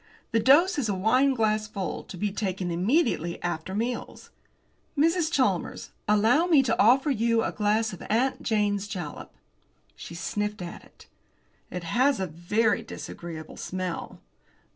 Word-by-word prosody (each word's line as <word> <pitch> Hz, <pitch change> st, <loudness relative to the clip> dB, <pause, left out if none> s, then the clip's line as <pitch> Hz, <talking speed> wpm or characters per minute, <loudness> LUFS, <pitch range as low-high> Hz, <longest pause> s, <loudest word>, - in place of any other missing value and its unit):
The 230 Hz, -, +3 dB
dose 290 Hz, -, +5 dB
is 235 Hz, -6 st, -1 dB
a 200 Hz, -, 0 dB
wine 255 Hz, +8 st, +3 dB
glassful, 215 Hz, -3 st, -1 dB
to 185 Hz, -, -9 dB
be 205 Hz, +3 st, -1 dB
taken 190 Hz, -3 st, -2 dB
immediately 180 Hz, -, +1 dB
after 175 Hz, +2 st, -3 dB
meals. 235 Hz, +3 st, -4 dB, 0.7 s
Mrs. 330 Hz, +2 st, +2 dB
Chalmers, 205 Hz, -, 0 dB, 0.2 s
allow 225 Hz, +11 st, +4 dB
me 305 Hz, -6 st, +5 dB
to 230 Hz, -3 st, +1 dB
offer 265 Hz, +6 st, +5 dB
you 230 Hz, -2 st, +2 dB
a -, -, -1 dB
glass 215 Hz, +1 st, +1 dB
of 185 Hz, -, -9 dB
'Aunt 250 Hz, +5 st, +1 dB
Jane's 205 Hz, -2 st, 0 dB
Jalap.'" 175 Hz, -7 st, -6 dB, 0.6 s
She 170 Hz, -, -9 dB
sniffed 210 Hz, +2 st, -3 dB
at 170 Hz, -, -8 dB
it. -, -, -19 dB, 0.6 s
"It 180 Hz, -1 st, -5 dB
has 255 Hz, +7 st, +2 dB
a 190 Hz, -, 0 dB
very 185 Hz, +8 st, 0 dB
disagreeable 170 Hz, -7 st, -8 dB
smell." 185 Hz, -2 st, -5 dB
215 Hz, 140 wpm, -27 LUFS, 185-250 Hz, 0.7 s, dose